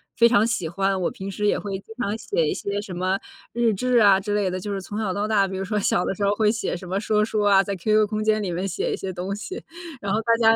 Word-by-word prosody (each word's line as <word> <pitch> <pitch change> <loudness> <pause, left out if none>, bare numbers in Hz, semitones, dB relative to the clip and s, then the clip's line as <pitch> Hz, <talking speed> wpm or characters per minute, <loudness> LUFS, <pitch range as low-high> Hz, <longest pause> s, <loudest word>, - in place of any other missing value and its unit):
非 235 - +6
常 225 -2 +4
喜 230 -8 -1
欢。 195 +1 0
我 - - +1
平 195 +1 -6
时 210 +2 -2
也 - - +2
会 195 -2 -4
经 225 - -13
常 210 -2 -1
写 195 -7 0
一 - - 0
些 200 0 -3
什 190 -3 -8
么 185 +2 0 0.3
日 235 -2 +2
志 250 +4 +1
啊， 200 -3 +6
之 205 +1 -2
类 200 -3 +1
的。 185 +1 -3
就 205 +2 -5
是 195 - -3
从 205 +3 -6
小 200 -4 -1
到 205 +2 -1
大， 200 -3 +3
比 190 - -5
如 195 - -2
说 210 +1 -1
小 180 -2 +1
的 - - -1
时 200 - -3
候 200 - +3
会 215 -1 +3
写 225 -5 -2
什 180 +1 -8
么 190 +2 -1
说 210 0 +1
书 215 -1 -1
啊， 200 -1 +5
在 200 -1 -3
QQ 215 +3 +2
空 215 0 -2
间 215 0 +2
里 180 - -2
面 185 +3 -2
写 185 - -2
一 - - -2
些 190 -1 -4
东 185 +3 -3
西。 375 - -7 0.4
然 200 0 -1
后 215 - +2
大 230 0 +2
家 225 -1 +5
205 Hz, 330 characters per minute, -24 LUFS, 190-215 Hz, 0.4 s, 非